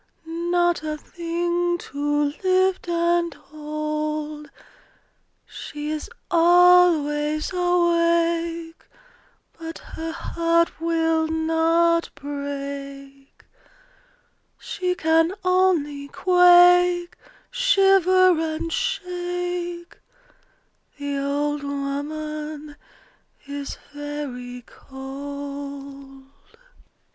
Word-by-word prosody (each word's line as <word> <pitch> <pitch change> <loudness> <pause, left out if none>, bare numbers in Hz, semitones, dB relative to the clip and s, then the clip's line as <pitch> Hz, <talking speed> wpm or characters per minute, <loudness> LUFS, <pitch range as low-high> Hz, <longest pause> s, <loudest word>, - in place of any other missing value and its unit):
Not 345 +1 0
a 305 -1 -4
thing 345 +2 -2
to 290 -2 -1
lift 375 -1 +2
and 340 0 +1
hold! 305 0 -5 1.0
She 295 +1 -7
is 310 +5 -5 0.2
always 335 -3 +4
awake, 335 -2 +1 0.8
But 325 0 -7
her 325 0 -7
heart 335 +1 +1
will 325 -1 +1
not 325 +1 +2
break: 280 -1 -7 1.1
She 365 -2 -3
can 325 +1 +2
only 350 -6 +1
quake, 355 +1 +5 0.4
Shiver, 385 -7 +4 0.2
and 330 +1 -4
shake: 355 -4 -3 1.0
The 285 -1 -3
old 290 +1 -1
woman 300 +2 -5 0.7
is 280 0 -6 0.2
very 275 -4 -6
cold. 275 0 -8
325 Hz, 65 wpm, -23 LUFS, 290-350 Hz, 1.1 s, quake